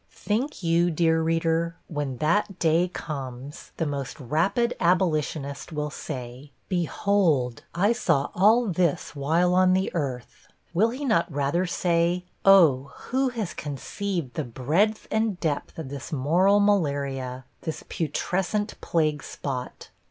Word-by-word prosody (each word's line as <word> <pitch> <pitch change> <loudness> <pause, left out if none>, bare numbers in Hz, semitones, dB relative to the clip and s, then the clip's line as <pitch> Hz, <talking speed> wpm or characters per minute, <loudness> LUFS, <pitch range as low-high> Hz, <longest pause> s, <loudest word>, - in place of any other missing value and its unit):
Think 235 +3 -3
you, 170 +1 +3
dear 160 0 +2
reader, 165 +1 0
when 145 -5 -3
that 190 - +1
day 165 +2 +3
comes, 140 -5 -7
the 165 - 0
most 140 -2 -4
'rapid 170 - +1
abolitionist' 155 -5 0
will 150 -1 -3
say 125 +2 -7 0.2
'Behold, 165 - +1
I 200 +5 +3
saw 160 - +1
all 220 +6 +5
this 180 -8 0
while 165 +6 +2
on 185 0 +5
the 190 +1 0
earth?' 130 -7 -4 0.3
Will 210 +7 +3
he 265 +5 -5
not 220 -10 +2
rather 145 +6 0
say, 175 0 +1 0.2
'Oh, 150 -9 +5 0.2
who 265 +1 +2
has 225 -7 -4
conceived 155 - -4
the 155 - -2
breadth 155 - 0
and 220 -4 0
depth 150 -4 -2
of 160 -5 -6
this 140 -1 -7
moral 175 +8 +3
malaria, 140 -10 0 0.2
this 160 - -5
putrescent 190 +6 -2
plague 155 -3 0
spot?' 130 -3 -6
165 Hz, 130 wpm, -26 LUFS, 140-190 Hz, 0.3 s, all